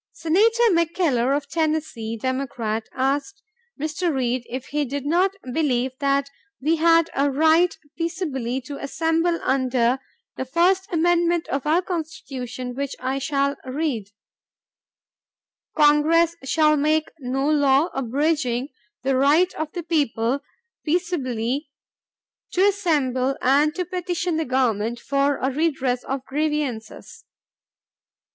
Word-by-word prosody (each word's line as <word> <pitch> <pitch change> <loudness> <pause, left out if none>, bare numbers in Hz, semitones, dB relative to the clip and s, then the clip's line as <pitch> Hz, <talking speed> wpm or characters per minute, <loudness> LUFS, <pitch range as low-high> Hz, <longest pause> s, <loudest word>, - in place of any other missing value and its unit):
Senator 440 +9 +2
McKellar 320 -7 +2
of 285 -1 -6
Tennessee, 305 -8 -2
Democrat, 240 -3 -3
asked 285 +10 -2 0.4
Mr. 315 +4 -1
Reed 255 -3 -1
if 255 +1 -5
he 295 +1 0
did 280 +1 -4
not 365 +6 +2 0.2
believe 260 -5 +1
that 280 -1 +1 0.3
we 315 +5 +1
had 330 0 +4
a 280 +1 +2
right 320 +5 +3 0.2
peaceably 300 -8 -2
to 280 +2 -8
assemble 325 +4 0
under 255 -1 +1 0.4
the 260 - -3
"first 360 +7 +2
amendment 345 0 +2
to 275 - -2
our 340 +4 +3
Constitution 265 -8 -5
which 280 +1 -4
I 260 +2 -2
shall 280 0 0
read: 260 -6 -3 1.7
Congress 315 +3 +4
shall 305 +2 +3
make 310 +2 +1
no 270 +1 -1
law... 285 +1 +3
abridging... 270 0 0 0.3
the 270 0 +1
right 295 +7 +4
of 315 -1 -4
the 350 - -4
people 280 -5 0 0.4
peaceably 285 -6 -1 0.8
to 375 +2 +4
assemble, 275 -10 +1
and 290 +4 +3
to 360 0 -2
petition 355 -1 -2
the 320 - -1
Government 240 -3 0
for 280 +1 +1
a 265 - -1
redress 270 -4 0
of 270 0 -4
grievances." 290 -6 -3
285 Hz, 120 wpm, -23 LUFS, 260-330 Hz, 1.7 s, had